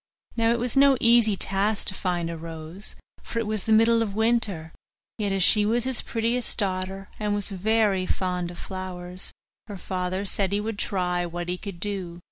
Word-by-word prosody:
Now 230 -1 +2
it 235 - +1
was 240 0 0
no 275 -1 +5
easy 230 -3 +4
task 195 +3 +2
to - - -5
find 175 -3 -2
a - - -5
rose, 165 +4 -5 0.3
for - - -6
it 230 - 0
was 215 -2 -1
the 220 - -1
middle 225 +1 +5
of 205 -3 -3
winter; 220 -8 0 0.5
yet 205 -2 -1
as 195 -1 +2
she 210 +3 +6
was 230 +3 +1
his 260 -1 +2
prettiest 235 +2 -1
daughter, 190 -1 -2
and 210 -1 -1
was 205 0 +2
very 200 -1 +1
fond 180 -2 -2
of 175 - -9
flowers, 185 -1 -3 0.4
her 205 -2 -7
father 185 +1 -3
said 195 0 +1
he 205 - +1
would 215 0 -4
try 180 -2 -1
what 175 +1 -5
he 180 - -2
could 195 -5 -7
do. 185 -3 -4
195 Hz, 195 wpm, -25 LUFS, 180-220 Hz, 0.5 s, she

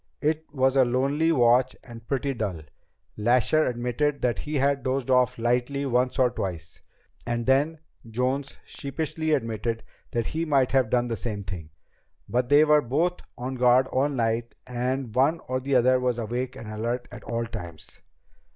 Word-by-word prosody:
It 155 +1 0
was 135 -1 +2
a 135 - +6
lonely 135 +6 +1
watch 125 -2 +4
and 115 -2 -12
pretty 135 +1 -1
dull. 100 -9 -3 0.6
Lasher 125 +7 +3
admitted 125 +4 -1
that 120 -2 +1
he 150 +1 -4
had 140 0 +2
dozed 130 0 -1
off 125 -2 +3
lightly 125 +4 0
once 125 0 +1
or 125 -2 +3
twice. 85 -8 -5 0.5
And 120 0 -1
then 145 +5 +2 0.3
Jones 130 +4 -2
sheepishly 155 +2 -4
admitted 115 -4 -1 0.3
that 115 -1 -1
he 160 +1 -2
might 140 -5 +2
have 130 -4 +3
done 120 0 +2
the 115 -2 -2
same 105 -4 -4
thing. 90 -4 -7 0.6
But 125 +1 0
they 145 +2 +6
were 150 -1 +5
both 160 +8 0 0.2
on 125 +2 -4
guard 125 0 +4
all 135 +3 +1
night, 115 -3 -1
and 125 -1 -2
one 140 +7 +3
or 130 0 -1
the 135 +1 -1
other 130 +1 +4
was 125 -2 0
awake 120 +3 -3
and 115 - -9
alert 115 +3 -3
at 125 - -10
all 115 0 -2
times." 85 -8 -9
125 Hz, 170 wpm, -26 LUFS, 120-140 Hz, 0.6 s, a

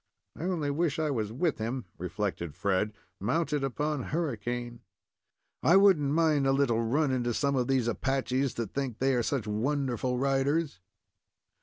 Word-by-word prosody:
"I 165 - -5
only 165 -6 0
wish 160 +1 0
I 155 -2 0
was 110 -5 -2
with 145 +5 0
him," 115 +2 -3
reflected 90 -3 -3
Fred, 100 +2 0 0.3
"mounted 145 - 0
upon 145 0 -1
Hurricane. 120 -6 -3 0.8
I 165 +8 +5
wouldn't 190 -8 +5
mind 155 -3 +3
a - - +4
little 130 -5 +2
run 135 +5 +1
into 120 -2 0
some 140 -1 +1
of 125 -2 +1
these 130 -3 +1
Apaches 130 +2 0
that 115 -4 -4
think 135 -5 -2
they 135 +2 +2
are 125 - +2
such 120 -1 -1
wonderful 125 +2 -1
riders." 140 - +1
135 Hz, 155 wpm, -29 LUFS, 115-145 Hz, 0.8 s, I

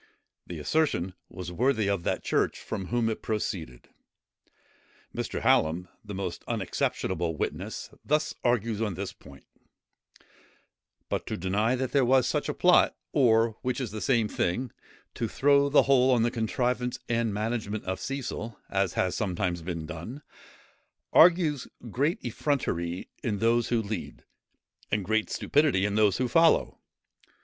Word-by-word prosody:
The 85 - -6
assertion 95 - 0 0.2
was 90 -1 -7
worthy 115 +1 +1
of 100 -3 0
that - - -1
church - - 0
from 95 -4 -5
whom 120 +1 +1
it 110 - -2
proceeded. 90 - -4 1.3
Mr. - - -3
Hallam, 85 +3 +2 0.2
a - - -4
most 95 -3 -4
unexceptionable 80 -2 -1
witness, - - -4
thus 150 +1 +1
argues 115 -3 +1
on 105 -5 -1
this - - -5
point: 70 0 -16 1.6
"But - - -3
to - - -3
deny 105 +7 +1
that 130 0 -2
there 140 -2 +3
was 130 +1 +4
such - - -1
a - - 0
plot, - - +4 0.2
or, 115 -3 +3
which 125 +1 -1
is 125 -5 -3
the 110 0 -5
same 115 -5 +2
thing, 110 +6 -1 0.4
to 115 - -2
throw 140 +4 +3
the 145 - +5
whole 130 -1 +4
on 120 -3 +4
the 120 - +1
contrivance 125 +2 -1
and 115 -1 0
management 110 0 -2
of 95 0 -3
Cecil, 130 -5 -4
as 95 -2 +1
has 90 -1 0
sometimes 90 -4 -1
been 85 -1 -4
done, 85 - -7 0.9
argues 165 -5 +5 0.2
great 145 - +1
effrontery 90 - -2
in 110 -6 -1
those 115 +2 +2
who 115 -2 +1
lead, 100 -3 -6 0.7
and 105 -3 0
great 110 +1 +1
stupidity 140 -10 +2
in 105 - -1
those 105 -3 +3
who 125 - 0
follow. 165 +5 +3
110 Hz, 145 wpm, -28 LUFS, 95-130 Hz, 1.6 s, the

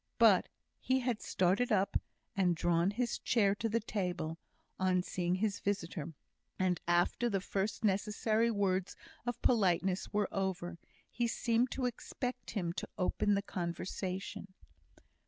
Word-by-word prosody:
But - - +6 0.3
he 260 0 +1
had 245 -3 -1
started 195 +8 +2
up, 200 -1 +2 0.4
and 180 -3 +3
drawn 170 +2 +2
his 235 +4 -1
chair 205 -4 +3
to 225 +3 -2
the 230 +2 +2
table, 180 -7 -3 0.4
on 185 -1 +2
seeing 180 -1 0
his 200 +1 0
visitor; 170 -5 -2 0.4
and, 180 -2 +1
after 175 +7 +2
the 200 -3 +1
first 200 +3 -2
necessary 215 +3 +2
words 195 -4 0 0.3
of 245 - -1
politeness 190 -4 +2
were 210 -1 +1
over, 180 -3 -2 0.3
he 240 -1 0
seemed 235 +1 +1
to 260 - -1
expect 250 +1 -4
him 175 -5 -2
to - - -5
open 205 +2 +2
the 200 - 0
conversation. 185 +1 -4
195 Hz, 135 wpm, -34 LUFS, 180-220 Hz, 0.4 s, But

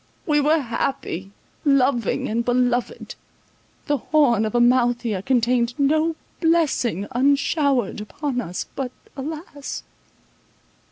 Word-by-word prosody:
We 295 -1 +3
were 305 +3 +3
happy, 230 - -3 0.3
loving, 265 -5 +2
and 230 +2 0
beloved; 245 - 0 0.7
the 290 -1 +1
horn 245 -6 +2
of 215 - -3
Amalthea 240 -4 +2
contained 240 +1 +1
no 310 +3 +2 0.2
blessing 305 - +1
unshowered 275 - +1
upon 250 +5 -3
us, 180 -5 -5
but, 265 -3 -3 0.2
alas! 290 0 -6
255 Hz, 100 wpm, -22 LUFS, 235-290 Hz, 0.7 s, We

